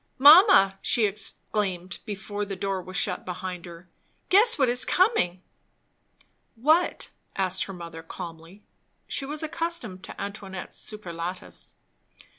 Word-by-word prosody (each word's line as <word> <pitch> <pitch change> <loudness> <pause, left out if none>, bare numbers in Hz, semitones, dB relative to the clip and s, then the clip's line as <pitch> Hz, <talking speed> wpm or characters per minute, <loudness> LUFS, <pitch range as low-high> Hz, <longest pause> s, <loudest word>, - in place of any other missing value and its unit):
"Mamma!" 285 - +7
she 230 - +2
exclaimed, 195 -3 -2
before 205 -1 -5
the 200 -1 -5
door 195 0 -2
was 185 +1 -5
shut 180 -3 +1
behind 180 -1 -6
her, 170 +1 -12 0.4
"Guess 430 +5 +6
what 265 -3 +3
is 245 +1 +4
coming." 270 - +1 1.1
"What?" 310 +9 +2 0.3
said 190 -1 0
her 195 - -8
mother 170 -2 -9
calmly. 165 +4 -10 0.4
She 275 - -3
was 300 +2 -5
accustomed 315 - -3
to - - -10
Antoinette's 200 -2 -7
superlatives. 180 -4 -7
195 Hz, 120 wpm, -26 LUFS, 180-250 Hz, 1.1 s, Mamma